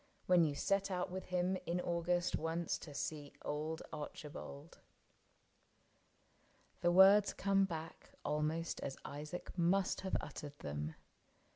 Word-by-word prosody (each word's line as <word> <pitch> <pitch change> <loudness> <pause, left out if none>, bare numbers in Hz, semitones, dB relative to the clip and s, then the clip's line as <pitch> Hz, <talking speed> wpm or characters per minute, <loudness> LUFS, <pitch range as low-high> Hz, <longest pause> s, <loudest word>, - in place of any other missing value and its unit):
When 180 -2 +6
you 150 -3 +1
set 195 +5 +1
out 180 -1 -1
with 185 +1 -4
him 180 +1 +1
in 175 +1 +1
August 175 0 +1
once 165 +1 -1
To 155 - -9
see 145 0 -4
old 155 +2 -2
Archibald." 150 0 -7 1.4
— - - -35
The 175 0 +4
words 195 +3 +8
come 195 0 +3
back 165 -3 -6 0.2
Almost 155 +2 0
as 135 - -4
Isaac 150 +5 -6
must 185 +2 +2
have 190 - 0
uttered 145 -1 -7
them. 75 - -4
170 Hz, 130 wpm, -37 LUFS, 150-180 Hz, 1.4 s, words